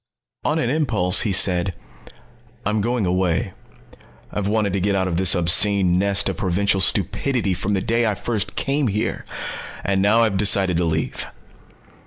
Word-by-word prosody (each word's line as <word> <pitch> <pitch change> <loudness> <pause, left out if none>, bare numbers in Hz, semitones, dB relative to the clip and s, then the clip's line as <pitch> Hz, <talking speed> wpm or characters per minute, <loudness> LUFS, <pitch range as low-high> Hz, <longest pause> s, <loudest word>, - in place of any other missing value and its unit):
On 155 - -1
an 125 -6 -1
impulse 110 - +1
he 105 - -1
said: 90 -1 +3 0.9
"I'm 105 +1 0
going 120 -1 -1
away. 90 -1 -1 0.8
I've 105 -1 -3
wanted 105 -2 -1
to 100 - -1
get 100 +2 0
out 95 -1 0
of 85 - -3
this 95 0 +5
obscene 90 +1 +3
nest 100 +1 +3
of 95 -3 -3
provincial 95 +1 0
stupidity 105 +2 +1
from 100 +3 -3
the 95 - -1
day 115 +2 0
I 105 - -1
first 105 0 -4
came 140 0 -1
here. 105 0 -3 0.6
And 95 0 0
now 110 +4 +3
I've 105 -4 0
decided 95 -3 +2
to 85 - 0
leave." 80 -1 -3
100 Hz, 165 wpm, -20 LUFS, 95-110 Hz, 0.9 s, this